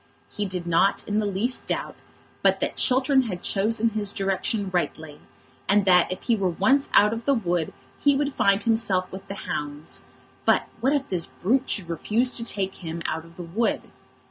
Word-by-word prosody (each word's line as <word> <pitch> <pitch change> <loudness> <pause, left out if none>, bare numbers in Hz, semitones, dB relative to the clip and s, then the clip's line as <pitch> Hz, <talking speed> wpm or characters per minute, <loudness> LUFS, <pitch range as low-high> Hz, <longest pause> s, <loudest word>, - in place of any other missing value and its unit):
He 210 - -3
did 185 -3 -4
not 175 +3 +2
in 210 +1 0
the 210 - 0
least 210 +6 0
doubt - - -3 0.5
but - - +3
that - - -2
Chiltern 265 +1 +3
had 180 -4 -5
chosen 225 +3 +2
his 210 -2 +1
direction 195 0 -1
rightly, 160 -3 -3 0.5
and 200 0 +4
that 180 -2 +5
if 185 - -5
he 235 - +2
were 195 -3 0
once 265 +11 +2
out 210 +1 +6
of 230 0 -6
the 280 - +3
wood 175 -7 -1 0.3
he 285 -1 +3
would 285 0 -1
find 200 +1 +2
himself 220 -5 +1
with 190 +1 -9
the 195 - -6
hounds; 145 +1 -5 0.4
but - - +3
what 265 +4 +2
if 280 -2 0
this 175 -3 0
brute 250 +8 0
should 195 -5 -1
refuse 220 +9 +1
to 230 - -3
take 195 -4 -2
him 165 0 -5
out 160 +1 -3
of 165 0 -17
the 180 - -6
wood? 200 +8 -1
200 Hz, 195 wpm, -25 LUFS, 180-230 Hz, 0.5 s, out